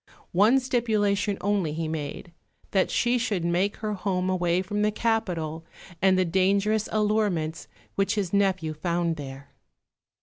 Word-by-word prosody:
One 215 Hz, +9 st, +5 dB
stipulation 215 Hz, -5 st, 0 dB
only 200 Hz, -6 st, 0 dB
he 160 Hz, 0 st, -2 dB
made, 155 Hz, +2 st, -5 dB, 0.4 s
that 190 Hz, -2 st, +2 dB
she 245 Hz, 0 st, +2 dB
should 205 Hz, -8 st, -1 dB
make 180 Hz, +4 st, +1 dB
her 215 Hz, -1 st, -3 dB
home 185 Hz, -2 st, -1 dB
away 180 Hz, 0 st, +1 dB
from 205 Hz, +2 st, -2 dB
the 210 Hz, 0 st, +2 dB
capital 175 Hz, -9 st, -1 dB, 0.4 s
and 190 Hz, 0 st, +4 dB
the 185 Hz, -, +3 dB
dangerous 200 Hz, +4 st, +1 dB
allurements 210 Hz, -7 st, 0 dB, 0.3 s
which 195 Hz, +2 st, 0 dB
his 200 Hz, -4 st, -2 dB
nephew 190 Hz, -5 st, +1 dB
found 170 Hz, +1 st, -1 dB
there. 140 Hz, -2 st, -9 dB
190 Hz, 140 wpm, -26 LUFS, 170-210 Hz, 0.4 s, One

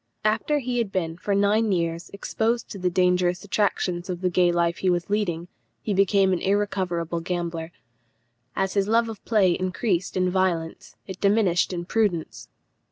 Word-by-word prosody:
After 220 Hz, +8 st, +1 dB
he 250 Hz, -3 st, -2 dB
had 220 Hz, -4 st, -1 dB
been 165 Hz, -4 st, -2 dB
for 200 Hz, +3 st, -2 dB
nine 205 Hz, +2 st, +2 dB
years 170 Hz, -2 st, -1 dB
exposed 225 Hz, +3 st, -2 dB
to 200 Hz, -, -7 dB
the 180 Hz, 0 st, +1 dB
dangerous 180 Hz, 0 st, +1 dB
attractions 195 Hz, -3 st, -1 dB
of 180 Hz, -1 st, -4 dB
the 180 Hz, -1 st, +1 dB
gay 175 Hz, 0 st, +3 dB
life 170 Hz, 0 st, 0 dB
he 190 Hz, -, +1 dB
was 175 Hz, +2 st, -1 dB
leading, 175 Hz, -5 st, -1 dB, 0.4 s
he 210 Hz, -, -1 dB
became 195 Hz, 0 st, +3 dB
an 180 Hz, -, 0 dB
irrecoverable 190 Hz, -4 st, -1 dB
gambler. 170 Hz, -1 st, -4 dB, 0.8 s
As 190 Hz, 0 st, 0 dB
his 200 Hz, -1 st, +1 dB
love 230 Hz, +1 st, +2 dB
of 220 Hz, -3 st, -9 dB
play 205 Hz, -5 st, +3 dB
increased 185 Hz, +1 st, -1 dB
in 185 Hz, 0 st, +1 dB
violence, 185 Hz, 0 st, -1 dB
it 190 Hz, -1 st, -9 dB
diminished 200 Hz, -4 st, +2 dB
in 175 Hz, -1 st, -4 dB
prudence. 195 Hz, -5 st, -1 dB
185 Hz, 165 wpm, -24 LUFS, 175-205 Hz, 0.8 s, gay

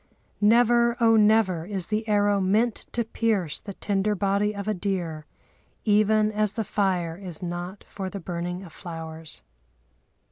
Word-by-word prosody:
"Never, 235 Hz, +2 st, +4 dB
oh, 225 Hz, -1 st, +5 dB
never 210 Hz, -5 st, +4 dB
is 190 Hz, -1 st, -2 dB
the 220 Hz, +1 st, -2 dB
arrow 205 Hz, -1 st, +3 dB
meant 215 Hz, +5 st, +1 dB
to 235 Hz, -, 0 dB
pierce 215 Hz, -8 st, -1 dB
the 200 Hz, -, -7 dB
tender 205 Hz, +1 st, 0 dB
body 200 Hz, +2 st, +1 dB
of 200 Hz, 0 st, -5 dB
a 215 Hz, -, +1 dB
deer, 175 Hz, -6 st, -3 dB, 0.6 s
even 215 Hz, 0 st, +3 dB
as 210 Hz, -1 st, 0 dB
the 225 Hz, 0 st, -2 dB
fire 185 Hz, -5 st, 0 dB
is 180 Hz, -4 st, -6 dB
not 175 Hz, +3 st, -5 dB
for 190 Hz, -2 st, -5 dB
the 200 Hz, -, -6 dB
burning 175 Hz, +1 st, -4 dB
of 170 Hz, -, -12 dB
flowers." 160 Hz, -, -8 dB
200 Hz, 150 wpm, -25 LUFS, 180-215 Hz, 0.6 s, oh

